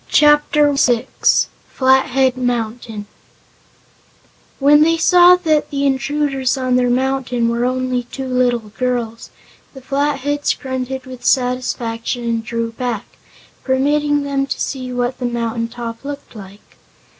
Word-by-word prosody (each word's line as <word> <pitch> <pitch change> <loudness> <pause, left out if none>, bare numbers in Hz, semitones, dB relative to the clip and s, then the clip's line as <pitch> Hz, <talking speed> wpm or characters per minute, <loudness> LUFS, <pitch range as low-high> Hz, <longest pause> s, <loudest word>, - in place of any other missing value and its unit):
Chapter 295 -1 +4
Six 245 -3 +2 0.2
Flathead 265 0 +2
Mountain 235 -3 -3 1.5
When 290 +2 +5
they 330 +1 +3
saw 355 +2 +6
that 315 -4 0
the 280 0 -1
intruders 270 0 0
on 255 -1 0
their 250 -1 +2
mountain 255 -2 0
were 235 +1 0
only 255 0 -1
two 265 +2 -7
little 245 -3 0
girls, 240 -3 -2 0.5
the 265 - -10
Flatheads 285 +1 -1
grunted 260 0 -5
with 255 -1 -10
satisfaction 245 -2 -1
and 230 -1 -1
drew 230 0 -3
back, 235 -2 -4 0.6
permitting 290 +2 +1
them 275 -1 -1
to - - -4
see 255 -2 -4
what 245 +1 -2
the 250 - -3
mountain 230 -1 -2
top 230 0 -7
looked 285 -3 -8
like. 200 -1 -13
255 Hz, 125 wpm, -18 LUFS, 240-280 Hz, 1.5 s, saw